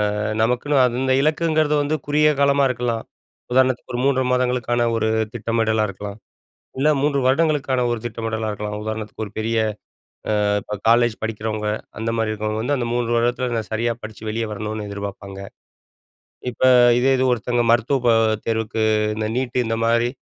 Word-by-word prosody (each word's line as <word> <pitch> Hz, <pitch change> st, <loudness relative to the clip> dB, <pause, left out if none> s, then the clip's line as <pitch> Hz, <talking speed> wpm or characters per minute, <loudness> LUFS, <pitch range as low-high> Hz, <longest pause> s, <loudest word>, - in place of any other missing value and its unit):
அ -, -, -3 dB, 0.2 s
நமக்குன்னு 125 Hz, +6 st, +1 dB
அந்த 130 Hz, +2 st, 0 dB
இலக்குங்கிறது 155 Hz, 0 st, +2 dB
வந்து 145 Hz, +2 st, 0 dB
குறுகிய 150 Hz, +1 st, +4 dB
காலமா 140 Hz, 0 st, +4 dB
இருக்கலாம். 120 Hz, -2 st, -2 dB, 0.5 s
உதாரணத்துக்கு 130 Hz, 0 st, +2 dB
ஒரு 120 Hz, -, -2 dB
3 135 Hz, -1 st, +2 dB
மாதங்களுக்கான 125 Hz, -1 st, +1 dB
ஒரு 110 Hz, -1 st, 0 dB, 0.3 s
திட்டமிடலா 115 Hz, -1 st, 0 dB
இருக்கலாம். 100 Hz, +2 st, -7 dB, 0.6 s
இல்ல 145 Hz, +3 st, +3 dB
3 140 Hz, 0 st, +1 dB
வருடங்களுக்கான 140 Hz, -2 st, +2 dB
ஒரு 120 Hz, -, -1 dB
திட்டமிடலா 115 Hz, -1 st, -3 dB
இருக்கலாம். 105 Hz, 0 st, -4 dB
உதாரணத்துக்கு 110 Hz, 0 st, -5 dB
ஒரு 105 Hz, -, -11 dB
பெரிய 115 Hz, +1 st, -1 dB, 0.9 s
அ -, -, +2 dB, 0.2 s
இப்ப 105 Hz, -, -6 dB
காலேஜ் 120 Hz, -1 st, +4 dB
படிக்கிறவங்க, 110 Hz, -1 st, -3 dB, 0.3 s
அந்தமாரி 115 Hz, 0 st, -1 dB
இருக்கிறவங்க 110 Hz, +1 st, -2 dB
வந்து 145 Hz, +5 st, 0 dB
அந்த 120 Hz, -, -2 dB
3 120 Hz, -1 st, -1 dB
வருடத்தில 120 Hz, +2 st, 0 dB
நான் 110 Hz, -1 st, -4 dB
சரியா 115 Hz, +2 st, 0 dB
படிச்சு, 110 Hz, -1 st, -9 dB
வெளிய 115 Hz, +1 st, -2 dB
வரணுனு 105 Hz, 0 st, -4 dB
எதிர்ப்பார்ப்பாங்க. 100 Hz, -1 st, -7 dB, 1.1 s
இப்ப 120 Hz, -, -12 dB, 0.4 s
இதே 135 Hz, +2 st, +3 dB
இது 130 Hz, -, +2 dB
ஒருத்தங்க 120 Hz, +1 st, 0 dB
மருத்துவ 120 Hz, +4 st, +3 dB
க -, -, +6 dB, 0.4 s
தேர்வுக்கு 110 Hz, -1 st, -1 dB, 0.3 s
இந்த 110 Hz, 0 st, -2 dB
நீட் 130 Hz, -1 st, -2 dB
இந்தமாரி, 115 Hz, +1 st, +1 dB
115 Hz, 150 wpm, -21 LUFS, 110-130 Hz, 1.1 s, க